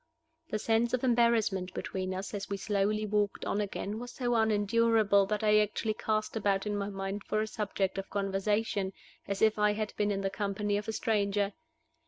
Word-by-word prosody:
The 215 - -1
sense 230 +3 +2
of 255 - -6
embarrassment 230 -7 +2
between 185 -1 -3
us 190 +3 -5
as 200 -1 -4
we 200 - -2
slowly 210 +1 0
walked 205 -1 0
on 210 - 0
again 205 +1 -4
was 245 +1 -6
so 245 -1 -1
unendurable 220 -2 +3
that 210 +1 -1
I 210 0 +5
actually 215 +1 0
cast 215 +1 -1
about 200 -2 +1
in 210 0 -1
my 200 0 -2
mind 195 +1 -4
for 215 - -1
a 215 - +1
subject 200 -3 -2
of 195 - -6
conversation, 200 0 0 0.3
as 200 +1 -1
if 215 -1 +4
I 210 0 +4
had 215 0 -3
been 210 0 +1
in 195 -1 -1
the 195 0 -1
company 205 0 -1
of 210 +1 -4
a - - -1
stranger! 205 -3 0
210 Hz, 195 wpm, -31 LUFS, 200-220 Hz, 0.3 s, I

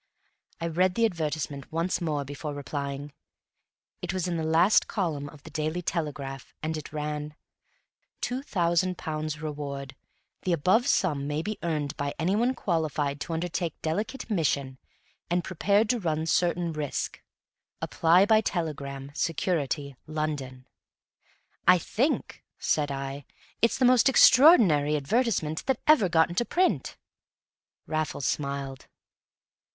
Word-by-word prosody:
I 165 - -3
read 180 +3 +1
the 230 - +3
advertisement 155 -7 -3
once 170 +3 -1
more 150 -4 -1
before 145 +1 -6
replying. 140 0 -5 0.9
It 180 - -2
was 185 -1 -1
in 175 - -1
the 160 - -2
last 165 +6 +4
column 155 -8 -2
of 145 -2 -15
the - - -11
Daily 155 +3 -2
Telegraph, 145 -6 -4
and 160 +1 -1
it 155 - -7
ran: 150 0 -4 0.8
TWO 250 +2 -2
THOUSAND 180 - +1
POUNDS 155 0 -4
REWARD 140 -3 -5 0.5
The 180 - 0
above 185 +9 +3
sum 145 -7 +1
may 150 +2 -2
be 215 +2 -4
earned 150 -3 -2
by 145 -1 -3
any 175 +4 +1
one 245 +4 +2
qualified 155 -7 -1
to 165 - -4
undertake 170 0 -2
delicate 215 +11 -2
mission 140 - -1 0.5
and 175 0 +1
prepared 200 +5 +2
to 245 - -1
run 160 -4 -1
certain 170 0 +1
risk. 150 -3 -3 0.6
Apply 175 +4 +4
by 215 0 +5
telegram, 140 -8 -4
Security, 145 -4 -1
London. 145 -5 -4 1.0
"I 180 - +8
think," 245 - -1
said 150 -2 0
I, 135 +1 -4 0.4
"it's 230 - +3
the 260 - +3
most 250 +1 +6
extraordinary 225 - +6
advertisement 160 - 0
that 265 -3 +1
ever 295 -12 +5
got 160 -1 +4
into 175 +7 0
print!" 360 +9 0 0.9
Raffles 155 -3 -2
smiled. 140 -2 -3
160 Hz, 135 wpm, -27 LUFS, 145-185 Hz, 1.0 s, I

